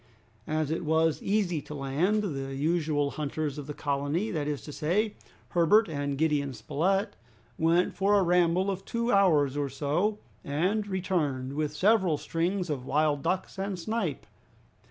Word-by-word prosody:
As 155 -1 -1
it 165 - -2
was 160 0 +2
easy 195 -6 0
to 150 - -9
land, 155 +10 0
the 135 -7 -4
usual 150 -1 0
hunters 150 -1 -3
of 140 - -7
the 150 - -4
colony, 145 +8 -1
that 150 -4 -2
is 145 -2 -3
to 150 - -8
say, 200 +9 0 0.4
Herbert 180 +6 +4
and 145 -3 -3
Gideon 145 -3 0
Spilett, 195 - 0 0.4
went 170 +3 +3
for 200 +2 +3
a 195 - +4
ramble 180 +2 +3
of 190 0 -5
two 235 +3 -1
hours 155 - +4
or 145 -1 -1
so, 155 +10 0 0.3
and 185 +9 0
returned 160 -9 -1
with 150 0 -2
several 190 -2 +3
strings 175 +5 -1
of 135 -4 -3
wild 150 0 +2
duck 185 +6 0
and 195 -1 -2
snipe. 180 - -3
160 Hz, 155 wpm, -28 LUFS, 145-190 Hz, 0.4 s, Herbert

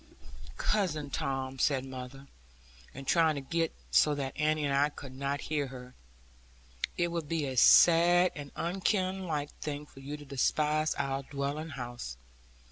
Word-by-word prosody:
'Cousin 155 -9 0
Tom,' 135 -1 -3
said 135 -1 +2
mother, 130 +1 -8 0.7
and 135 +1 -9
trying 160 +2 +3
to 140 - -3
get 165 +3 -1 0.2
so 150 -1 +4
that 135 -2 -4
Annie 155 0 +1
and 140 - 0
I 140 +2 +3
could 135 -3 -10
not 140 +2 -2
hear 150 -2 -1
her; 125 -1 -10 1.0
'it 175 0 +1
would 165 -3 -3
be 165 -3 0
a 130 -1 -4
sad 175 +6 +6
and 145 -1 -8
unkinlike 185 -4 -1
thing 150 -1 -4
for 135 - -16
you 145 +2 -6
to 145 - -12
despise 150 +3 +1
our 135 -1 -1
dwelling 140 +3 -4
house. 120 - -6
145 Hz, 150 wpm, -31 LUFS, 135-160 Hz, 1.0 s, sad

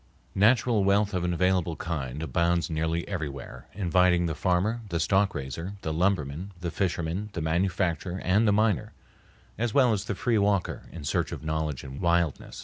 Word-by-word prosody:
Natural 110 +1 +3
wealth 100 +1 +2
of 90 -2 -1
an 90 - 0
available 90 -1 +1
kind 75 -3 -4
abounds 85 0 +1
nearly 80 +2 -1
everywhere, 75 -8 -6
inviting 90 -2 +3
the 80 - -1
farmer, 95 +9 0
the 85 - -1
stock 95 +4 +2
raiser, 75 +7 -5
the 80 - -2
lumberman, 90 0 -1
the 85 -1 -3
fisherman, 90 +1 -2
the 85 - -3
manufacturer, 90 +1 0
and 105 +5 +3
the - - +5
miner, 105 -2 +1 0.7
as 115 -2 -1
well 125 -5 +5
as 100 - -2
the 105 - -2
free 115 +2 +1
walker 100 -2 0
in 85 - -8
search 70 - -1
of - - -6
knowledge 80 -2 -2
and 65 +1 -8
wildness. 85 -3 0
90 Hz, 170 wpm, -27 LUFS, 80-100 Hz, 0.7 s, the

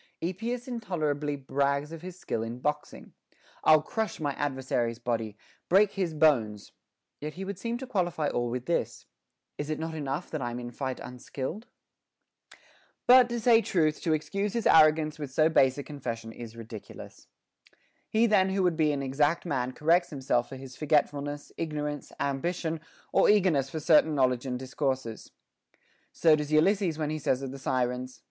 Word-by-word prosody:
Epeus 230 +8 -3
intolerably 155 - -2
brags 140 +2 -1
of 165 -1 -8
his 180 0 -8
skill 115 -10 -3
in 115 +2 -4
boxing, 150 +3 -4 0.5
I'll 155 -1 +6
crush 220 +1 -3
my 145 -3 -1
adversary's 130 -5 -1
body, 115 -3 -3 0.3
break 195 +3 +5
his 180 -5 -2
bones; 115 -10 +2 0.5
yet 150 +1 -6
he 190 +2 -5
would 200 -1 -5
seem 235 0 -2
to 265 - -6
qualify 175 - -1
all 120 -3 -1
with 125 +1 -4
this, 170 - -2 0.5
Is 145 - -3
't 155 - 0
not 160 +1 -4
enough 145 +1 -4
that 155 - -3
I'm 120 0 -3
in 120 0 -6
fight 130 +1 -4
unskilled? 130 - -6 0.7
* - - -27
But, 250 -1 +7
to 235 0 -2
say 230 0 +5
truth, 155 -7 +1
to 160 - +1
excuse 195 +6 -2
his 235 - -2
arrogance 155 0 +5
with 145 -3 -5
so 155 +4 +3
base 135 -4 +4
a 145 - -4
confession 115 -6 -6
is 115 0 -10
ridiculous. 115 -2 -10 0.8
He 220 +2 +3
then 200 -4 +4
who 190 0 0
would 175 -2 +2
be 155 -2 +3
an 140 -1 -2
exact 145 +6 +1
man 130 -6 -1
corrects 170 +6 +2
himself 130 -4 0
for 135 - -7
his 130 -1 -10
forgetfulness, 145 -1 0
ignorance, 150 -2 -4
am 140 -1 -1
bition, 165 -1 -2 0.3
or - - +5
eagerness 180 -10 +3
for 160 - -4
certain 155 0 +4
knowledge 130 -1 +1
and 125 -1 -2
discourses. 130 -2 -3 0.8
So 160 -2 +4
does 150 0 -4
Ulysses 175 +1 +3
when 155 -1 -2
he 155 - -3
says 135 -2 0
of 135 - -4
the 135 - -8
Sirens. 125 -1 -2
150 Hz, 175 wpm, -28 LUFS, 130-170 Hz, 0.8 s, But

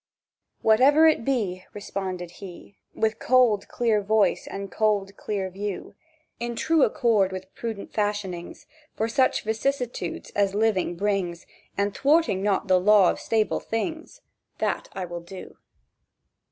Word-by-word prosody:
"Whatever 270 +8 +6
it 310 -7 +4
be," 210 -9 -1
Responded 190 -4 -5
he, 190 +1 -11 0.2
With 220 0 0
cold, 245 -5 +3
clear 225 -3 +1
voice, 215 +1 +1
and 195 -1 -6
cold, 205 -2 0
clear 200 -2 -3
view, 200 +1 -5 0.5
"In 235 0 -3
true 325 +5 +2
accord 215 -8 +3
with 190 0 -8
prudent 225 -4 -6
fashionings 205 -5 -3 0.3
For 220 - 0
such 260 +3 +2
vicissitudes 230 -4 -2
as 200 -1 +1
living 205 -5 +1
brings, 185 -3 -2 0.3
And 200 0 0
thwarting 290 - +2
not 200 0 0
the 185 -1 +4
law 200 -1 +5
of - - -6
stable 220 -1 0
things, 320 - -4 0.4
That - - -2
will 175 -2 -5
I - - -18
do." 185 +2 -10
205 Hz, 135 wpm, -25 LUFS, 190-230 Hz, 0.5 s, Whatever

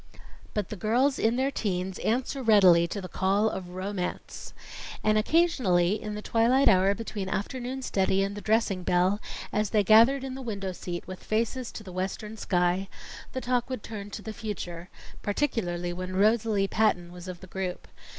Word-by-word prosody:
But 210 -3 -1
the - - -5
girls 240 +8 +1
in 225 +2 +2
their 265 +2 +1
teens 190 -6 -2
answer 255 +4 -1
readily 190 -7 +6
to 200 +3 -5
the 185 - -6
call 195 +4 +1
of 180 -2 -6
ROMANCE. 185 -1 -4 0.5
And 215 0 +3
occasionally, 215 - +2
in 210 -1 -5
the 210 - -6
twilight 240 +4 +3
hour 195 -1 +5
between 210 -3 -5
afternoon 255 +6 -3
study 195 -3 +1
and 200 +1 -3
the 205 - -6
dressing 215 -3 +1
bell, 180 +3 +2 0.3
as 210 -1 +1
they 210 -2 +3
gathered 230 +6 +6
in 265 -1 -4
the 265 - -6
window 200 -6 -4
seat 175 -1 -6
with 185 0 -9
faces 230 +3 -1
to 215 - -7
the 185 -3 -10
western 195 +4 -4
sky, 180 -1 0 0.4
the 260 - -3
talk 245 0 0
would 255 -5 -4
turn 205 -2 -7
to 205 0 -7
the 220 - -6
future 180 -5 -6 0.3
particularly 180 -7 -1
when 185 +1 -5
Rosalie 210 0 +3
Patton 180 -5 +1
was 180 +1 -10
of 180 -1 -6
the 190 - -11
group. 185 -1 -5
205 Hz, 180 wpm, -28 LUFS, 185-230 Hz, 0.5 s, readily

